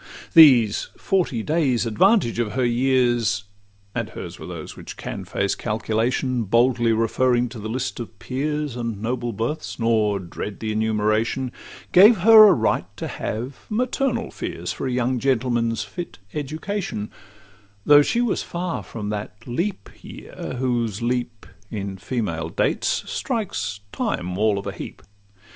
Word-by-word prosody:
These 125 -10 +7
forty 170 - 0
days' 140 -6 +1
advantage 120 - +3
of 110 -3 -1
her 130 -1 +1
years— 120 -5 +2 0.5
And - - -3
hers - - -8
were - - -8
those - - -7
which - - -10
can - - -6
face 100 0 -1
calculation, 115 +3 -1
Boldly 120 +2 +3
referring 120 +2 +2
to 115 -1 -9
the 110 +1 -5
list 125 +2 -3
of 115 -2 -8
peers 150 +3 -3
And 115 -4 -4
noble 120 +2 -2
births, 115 +9 -3
nor 110 -3 +2
dread 95 +2 -6
the 110 -1 -3
enumeration— 110 +3 0 0.4
Gave 205 +5 +8
her 215 +1 +9
a 195 - +7
right - - 0
to - - -4
have 120 +6 -5
maternal 250 +4 -1
fears - - -4
For - - -4
a - - -1
young 125 0 0
gentleman's 120 -3 +1
fit 170 - -7 0.2
education, 155 - -4 0.7
Though 145 0 +8
she 235 +11 +1
was 240 -3 0
far 175 0 -3
from 105 -3 -6
that 105 0 -6
leap 170 - -2
year, - - -8
whose 120 -4 -1
leap, 120 -2 -2 0.2
In 100 -2 -4
female 90 -8 -3
dates, - - 0
strikes 110 - -3
Time 90 +1 -2
all 105 +1 +2
of 100 - -5
a - - -2
heap. - - -9
120 Hz, 145 wpm, -23 LUFS, 110-140 Hz, 0.7 s, her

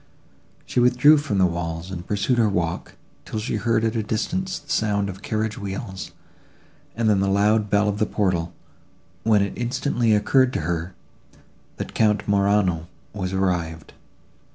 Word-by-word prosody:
She - - -1
withdrew 125 +5 +6
from 145 -9 -2
the 95 - +5
walls, 85 0 -3
and 85 -1 -7
pursued 105 +5 0
her 110 -2 +4
walk, 85 -3 -2 0.3
till - - -6
she 110 0 -2
heard 115 +1 +1
at 115 0 0
a 115 - +1
distance 185 - -2
the 145 - -15
sound 105 -7 +1
of 95 +1 -8
carriage 110 0 -2
wheels, 95 -1 -5 0.9
and 115 -1 0
then 105 -2 +4
the 100 - +1
loud 105 +2 +2
bell 105 +1 +3
of 105 0 -1
the 110 - +1
portal, 90 -5 0 0.7
when 105 -3 +3
it 100 - -3
instantly 120 -2 +1
occurred 130 +5 +3
to - - -1
her, 85 +3 -3 0.8
that - - -6
Count 105 -1 +2
Morano 100 -5 +2 0.3
was 95 -3 -3
arrived. 90 -4 -2
105 Hz, 160 wpm, -23 LUFS, 95-110 Hz, 0.9 s, withdrew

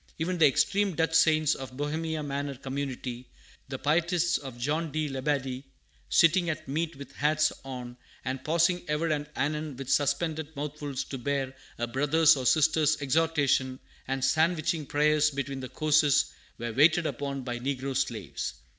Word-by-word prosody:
Even 175 +2 -2
the 155 - +7
extreme 195 +7 +1
Dutch 160 0 0
saints 155 -1 +4
of 130 -1 -8
Bohemia 155 +2 -2
Manor 140 0 -3
community, 130 -2 -5 0.4
the - - -4
pietists 175 +3 +1
of 135 -4 -9
John 150 +6 -1
de 155 0 -1
Labadie, 135 -1 -2 0.5
sitting 170 +1 +4
at 155 - -4
meat 160 +4 -2
with 140 +1 -10
hats 155 +1 +2
on, 125 -2 -7 0.3
and 130 0 -3
pausing 170 +3 +2
ever 150 +2 0
and 150 -1 -1
anon 150 0 -2
with 135 -1 -5
suspended 160 +1 0
mouthfuls 145 -1 -4
to 135 - -7
bear 135 0 -2 0.2
a 120 - -1
brother's 145 +6 +4
or 130 -2 -1
sister's 155 0 +3
exhortation, 140 -3 +1 0.3
and 135 0 0
sandwiching 160 0 +1
prayers 150 +1 +3
between 140 -1 -4
the 130 -1 -6
courses, 150 -2 +3 0.2
were 120 0 -4
waited 155 +6 +4
upon 140 -3 -3
by 120 -1 -4
negro 135 +1 -3
slaves. 105 - -3
145 Hz, 155 wpm, -28 LUFS, 135-160 Hz, 0.5 s, the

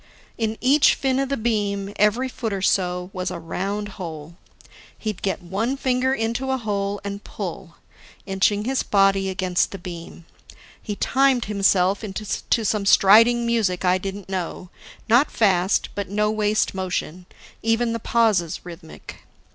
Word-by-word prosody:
In 220 -1 -2
each 275 +3 +5
fin 265 -1 0
of 275 -1 -1
the 275 - -1
beam, 205 -3 -1
every 210 +5 +2
foot 235 -3 -4
or 195 -1 -3
so, 180 -1 0
was 185 0 -3
a 180 - -5
round 195 +5 -4
hole. 160 -2 -7 0.6
He'd 215 -4 -5
get 190 -2 -2
one 210 +9 -2
finger 260 -1 +1
into 235 +1 -1
a 265 - +1
hole 205 -3 -2
and 200 0 -6
pull, 175 -3 -7 0.5
inching 200 +2 +1
his 265 +1 0
body 195 -1 +2
against 185 -1 0
the 195 - -7
beam. 170 -2 -9 0.6
He 210 - -5
timed 265 +1 +2
himself 195 -2 +2
to 215 +2 -2
some 205 -1 0
striding 230 +5 +6
music 210 -6 0
I 180 +1 +3
didn't 195 +1 -6
know, 180 -1 -5 0.4
not 240 +6 +4
fast 190 -3 +2
but 200 -2 -4
no 210 +1 +1
waste 215 0 +1
motion, 180 -2 -4 0.3
even 225 +1 +1
the 230 - -3
pauses 210 -8 +1
rhythmic. 170 -2 -11
200 Hz, 150 wpm, -23 LUFS, 185-225 Hz, 0.6 s, striding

